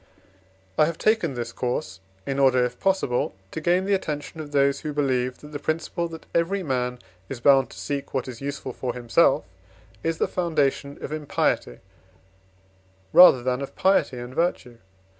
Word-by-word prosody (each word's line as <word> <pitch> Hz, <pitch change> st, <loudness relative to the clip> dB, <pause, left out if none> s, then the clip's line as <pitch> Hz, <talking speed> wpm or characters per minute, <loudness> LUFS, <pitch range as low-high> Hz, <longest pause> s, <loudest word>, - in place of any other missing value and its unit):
I -, -, +7 dB
have 165 Hz, +1 st, -3 dB
taken 215 Hz, -, +1 dB
this 120 Hz, -1 st, -4 dB
course, 110 Hz, -7 st, -3 dB, 0.3 s
in 135 Hz, 0 st, -2 dB
order, 130 Hz, -2 st, +4 dB
if 125 Hz, 0 st, -6 dB
possible, 190 Hz, -, 0 dB, 0.2 s
to 160 Hz, -, -5 dB
gain 175 Hz, +3 st, +2 dB
the 200 Hz, -, +1 dB
attention 155 Hz, -4 st, -3 dB
of 150 Hz, -2 st, -7 dB
those 140 Hz, -1 st, +2 dB
who 150 Hz, -1 st, -5 dB
believe, 130 Hz, -3 st, 0 dB
that 150 Hz, -, -11 dB
the 145 Hz, -, -5 dB
principle 165 Hz, +3 st, -2 dB
that 165 Hz, -1 st, -10 dB
every 185 Hz, +4 st, +1 dB
man 125 Hz, -4 st, -1 dB, 0.3 s
is 130 Hz, -, -5 dB
bound 135 Hz, +2 st, +5 dB
to -, -, -13 dB
seek 140 Hz, -1 st, -4 dB
what 130 Hz, -1 st, -2 dB
is 125 Hz, -1 st, -8 dB
useful 140 Hz, -2 st, -5 dB
for 125 Hz, -1 st, -4 dB
himself 125 Hz, -, +3 dB, 0.6 s
is 165 Hz, 0 st, -1 dB
the -, -, +1 dB
foundation 145 Hz, -5 st, -1 dB
of -, -, -5 dB
impiety, 150 Hz, -, -1 dB, 1.3 s
rather 130 Hz, -9 st, +8 dB
than 125 Hz, +1 st, -1 dB
of 140 Hz, -, -6 dB
piety 190 Hz, -9 st, +2 dB
and 120 Hz, +1 st, -7 dB
virtue. 130 Hz, -8 st, -1 dB
140 Hz, 170 wpm, -24 LUFS, 125-165 Hz, 1.3 s, rather